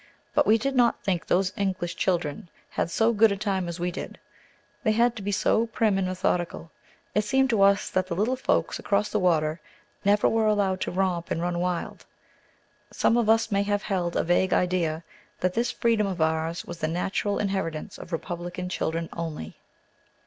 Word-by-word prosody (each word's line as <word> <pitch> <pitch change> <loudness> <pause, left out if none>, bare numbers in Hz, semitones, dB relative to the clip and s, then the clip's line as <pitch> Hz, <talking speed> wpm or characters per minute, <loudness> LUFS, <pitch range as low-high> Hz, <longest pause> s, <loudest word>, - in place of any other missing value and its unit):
But - - +3
we 220 - +6
did 270 +4 -2
not 240 -2 +3
think 185 -4 -1
those 185 +1 +2
English 185 -4 -2
children 170 -3 -1 0.2
had - - -1
so 225 +6 +2
good 220 0 +5
a 200 - -1
time 190 -3 -1
as 170 0 -5
we 175 +1 -1
did; - - -7 0.6
they 215 -4 +2
had 235 +2 +3
to 215 - -6
be 200 +1 -2
so 220 +3 +2
prim 215 -3 +1
and 185 - 0
methodical. 180 -2 -2 0.4
It 210 - +2
seemed 265 +5 +2
to 220 -4 +2
us 200 0 +4
that 185 0 0
the 170 - -3
little 220 +8 +1
folks 260 - 0
across 205 +1 0
the 215 - 0
water 160 -3 +1 0.4
never 205 +1 +4
were 225 -1 +2
allowed 200 -3 +1
to - - -2
romp 180 -2 -1
and - - -1
run 175 0 -1
wild; 180 -1 -3 0.8
some - - +2
of 235 -2 +2
us 225 0 +3
may 200 0 +2
have 205 0 0
held 180 -4 -1
a - - +2
vague 175 +2 +2
idea 170 -3 0 0.4
that 185 0 0
this 235 +3 0
freedom 225 -3 +1
of 185 -2 -4
ours 160 +1 0
was 175 -1 -8
the 155 - 0
natural 190 +4 -1
inheritance 190 -6 -3
of 175 - -10
republican 175 +1 -4
children 165 -2 -2
only. 160 - -6
190 Hz, 190 wpm, -26 LUFS, 175-210 Hz, 0.8 s, we